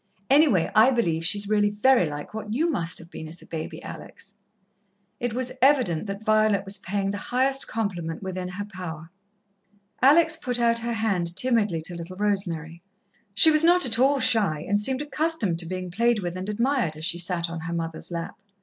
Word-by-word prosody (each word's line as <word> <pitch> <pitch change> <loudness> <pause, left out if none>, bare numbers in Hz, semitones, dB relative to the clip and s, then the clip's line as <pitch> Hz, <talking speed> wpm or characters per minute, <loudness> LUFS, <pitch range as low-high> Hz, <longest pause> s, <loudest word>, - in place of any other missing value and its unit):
Anyway, 275 - +4
I 220 +4 +6
believe 170 -11 0
she's 200 +4 +1
really 205 0 +2
very 210 -1 +3
like 145 +4 -7
what 215 -1 -6
you 330 +5 +1
must 170 - -1
have 170 0 -6
been 160 - -8
as 165 +2 -7
a - - -15
baby, 160 -1 -7
Alex!" - - -11 0.9
It 240 -1 -2
was 255 0 -1
evident 250 - +3
that 200 +2 -6
Violet 215 -2 +2
was 195 0 -3
paying 195 0 -2
the 205 - -5
highest 265 +2 +2
compliment 180 -7 -4
within 185 -1 -4
her 190 +3 -6
power. 170 -5 -8 0.9
Alex 315 +4 +5
put 250 -6 -3
out 230 -1 +2
her 235 +1 -3
hand 190 -7 0
timidly 210 -10 +1
to 175 - -5
little 170 +2 -8
Rosemary. 175 -5 -2 0.5
She 315 +10 +7
was 305 0 +4
not 350 0 +5
at 230 -2 0
all 275 +2 +3
shy, 195 - +1
and 205 +1 +2
seemed 260 +6 +1
accustomed 295 - -1
to 170 - -2
being 185 0 -5
played 235 +5 +2
with 175 -3 -4
and 185 +2 -5
admired, 235 - 0
as 155 +1 -5
she 175 +1 -1
sat 175 -1 0
on 165 0 -6
her 165 +1 -5
mother's 165 -1 -4
lap. 170 +2 -6
205 Hz, 195 wpm, -25 LUFS, 170-245 Hz, 0.9 s, She